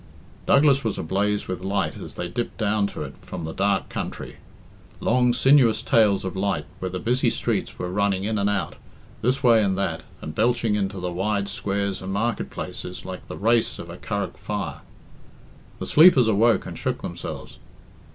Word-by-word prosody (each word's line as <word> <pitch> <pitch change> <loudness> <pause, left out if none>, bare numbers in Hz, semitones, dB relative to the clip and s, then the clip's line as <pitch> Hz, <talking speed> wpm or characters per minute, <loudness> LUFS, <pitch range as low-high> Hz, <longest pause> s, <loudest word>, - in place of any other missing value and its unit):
Douglas 140 -1 +5
was 110 - -1
ablaze 100 +5 0
with 90 0 -4
light 100 +1 -1
as - - -9
they 90 - -3
dipped 120 +7 -4
down 105 -2 +1
to - - -6
it - - -7
from 90 -3 -7
the 80 0 -4
dark 100 -1 +1
country. - - -6 0.6
Long 125 +1 +3
sinuous 130 -2 +4
tails 105 -4 +3
of 95 - -4
light 95 -6 -1
where 95 - -3
the 90 - -4
busy 120 +6 +1
streets - - -2
were, 90 - -3
running 100 -1 +1
in 110 +1 -1
and 100 +1 +2
out, 100 -1 -2 0.4
this 130 +4 +1
way 115 -3 +6
and 95 -2 0
that, 100 - -1 0.2
and 75 - -7
belching 115 +2 +1
into 100 -1 -1
the 90 0 -3
wide 100 +3 -1
squares 100 0 -2
and 95 +1 -5
market 110 +3 -1
places 90 - -6
like 95 -1 -7
the - - -7
race 115 +2 +2
of - - -8
a - - -8
Curragh - - -3
fire. 90 -8 -4 1.0
The - - -5
sleepers 150 -7 +7
awoke 110 +2 +3
and - - -7
shook - - -3
themselves. - - -7
100 Hz, 180 wpm, -24 LUFS, 95-115 Hz, 1.0 s, sleepers